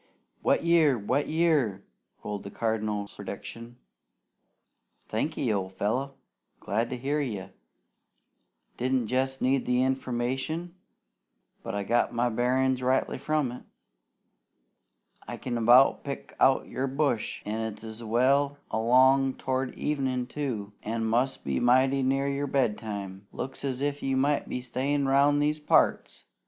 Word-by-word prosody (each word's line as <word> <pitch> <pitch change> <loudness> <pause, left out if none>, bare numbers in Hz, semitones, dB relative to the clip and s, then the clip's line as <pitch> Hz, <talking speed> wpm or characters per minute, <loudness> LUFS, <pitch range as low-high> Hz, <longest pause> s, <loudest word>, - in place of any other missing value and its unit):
"Wet - - +2
year! 165 -6 +4
Wet 125 +7 0
year!" 150 - +1 0.4
rolled 105 -1 -4
the 100 - -8
Cardinal's 105 -2 -2
prediction. 115 +1 -8 1.3
"Thanky, - - -1
old 95 -1 -3
fellow! 130 +8 -2 0.4
Glad 110 +5 -1
to 125 - -4
hear 140 +4 -1
you! 105 -9 -4 1.3
Didn't 130 -1 0
jest 130 +1 -1
need 130 0 +1
the 125 0 +3
information, 130 +6 -2 0.9
but - - -5
I 100 - -1
got 120 +4 +1
my 120 +1 +2
bearin's 130 +2 +1
rightly 130 +1 +1
from 150 -2 0
it! 125 - -8 1.7
I - - -5
can 125 -2 -4
about 120 +3 +5
pick 140 -1 -7
out 135 - +4
your 135 +2 -2
bush, 135 -4 -1
an' 110 +2 -2
it's 110 +1 -6
well 135 +5 +2
along 130 +4 +4
towards 130 0 -2
evenin', 130 -4 -1
too, 125 -7 -4
an' 115 +1 -2
must 120 +4 0
be 70 -1 -1
mighty 130 +2 +3
near 135 +1 +1
your 140 +1 -1
bedtime. 105 -7 -2
Looks 135 - -6
as 135 -2 -2
if 145 0 -1
you 135 -1 0
might 145 +2 +1
be 125 - -3
stayin' 135 +3 -1
round 140 +2 +4
these 150 +1 0
parts! 150 - +1
130 Hz, 135 wpm, -28 LUFS, 115-140 Hz, 1.7 s, about